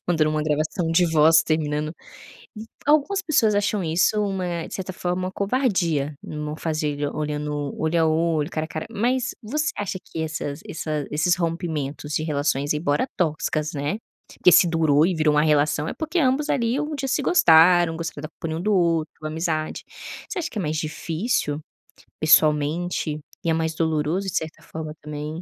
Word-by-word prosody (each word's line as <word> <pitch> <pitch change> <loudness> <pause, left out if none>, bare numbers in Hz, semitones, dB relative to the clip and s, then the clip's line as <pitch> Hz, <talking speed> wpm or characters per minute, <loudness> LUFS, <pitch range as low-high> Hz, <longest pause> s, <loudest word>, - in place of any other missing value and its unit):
mandando 160 -3 +2
uma 155 0 0
gravação 155 +3 -1
de 170 0 +3
voz 160 +1 +6
terminando, 150 -1 -1 0.7
m 215 +1 -7 0.2
algumas 310 +7 +3
pessoas 300 - +2
acham 205 -1 0
isso 165 +5 +2
uma 180 -4 -2
de - - -10
certa 190 -1 -4
forma, 180 0 -2
uma - - -5
covardia, 190 - 0
não 150 0 -5
fazer 155 -3 -2
e 145 - 0
olhando 150 -1 -3
olho 160 +1 +1
a - - +4
olho, 160 -1 +1
cara 155 -2 -2
a - - -11
cara, 155 0 -5
mas, 245 +4 0
você 300 +7 -1
acha 195 -2 -3
que 160 - -6
essas 155 -2 -4
essa 155 -2 -3
esses 155 +4 +2
rompimentos 160 -4 -3
de 155 - 0
relações, 145 -2 0
embora 150 - 0
tóxicas, 155 -2 -1
né, 145 +7 -2 0.3
porque 180 - +3
se 175 - +7
durou 160 -3 +3
e 185 - +1
virou 155 -1 +2
uma 150 - +4
relação 150 0 +2
é - - -3
porque 315 +2 -3
ambos, 285 +1 +1
ali, 235 +1 +1
um 300 0 -3
dia 275 -1 -3
se 270 +3 0
gostaram, 175 - +5
gostaram 165 -3 -5
da 155 - -5
companhia 160 0 -5
um - - -4
do 210 +1 +2
outro, 165 -4 +1
amizade. 155 0 -2 0.4
Você 400 - -4
acha 340 0 -3
que - - -8
é - - 0
mais 155 -2 -2
difícil, 155 +1 -2 0.6
pessoalmente, 155 +1 +2 0.2
e 170 - 0
é - - +3
mais 160 0 -1
doloroso, 160 +4 0
de 190 - -4
certa 160 0 -4
forma 155 -1 -7
também? 150 +2 -6
160 Hz, 180 wpm, -23 LUFS, 150-185 Hz, 0.7 s, se